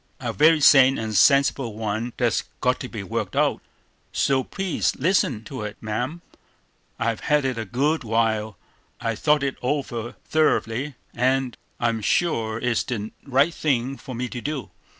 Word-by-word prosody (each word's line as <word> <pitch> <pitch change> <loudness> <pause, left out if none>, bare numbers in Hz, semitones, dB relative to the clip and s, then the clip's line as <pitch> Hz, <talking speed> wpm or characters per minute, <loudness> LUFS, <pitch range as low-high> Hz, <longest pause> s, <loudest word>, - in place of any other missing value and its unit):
"A - - -3
very 155 +1 +5
sane 135 -1 +7
and 110 -1 -3
sensible 135 0 +4
one 110 +2 -3
that's 120 -5 +1
got - - +1
to - - -6
be - - -6
worked - - -3
out, - - +2 0.5
so 135 -1 +1
please 195 +4 -1
listen 140 - +1
to 130 +2 -7
it, 105 0 -6
ma'am. 125 +10 -3 0.7
I've 115 -1 -1
had 150 -2 +1
it 130 -3 -1
a 115 - -3
good 140 +9 0
while, 110 -2 0 0.4
I've 115 -2 -2
thought 150 -2 +3
it 140 -1 -2
over 125 -4 -2
thoroughly, 140 -3 +1 0.2
and 130 0 +1 0.2
I'm 115 -2 0
sure 110 -4 0
it's 120 -1 0
the 110 -4 -4
right 140 +4 +3
thing 135 -4 0
for 130 -2 -9
me 125 +2 -2
to 120 - -6
do. 145 -2 -4
125 Hz, 160 wpm, -24 LUFS, 115-140 Hz, 0.7 s, sane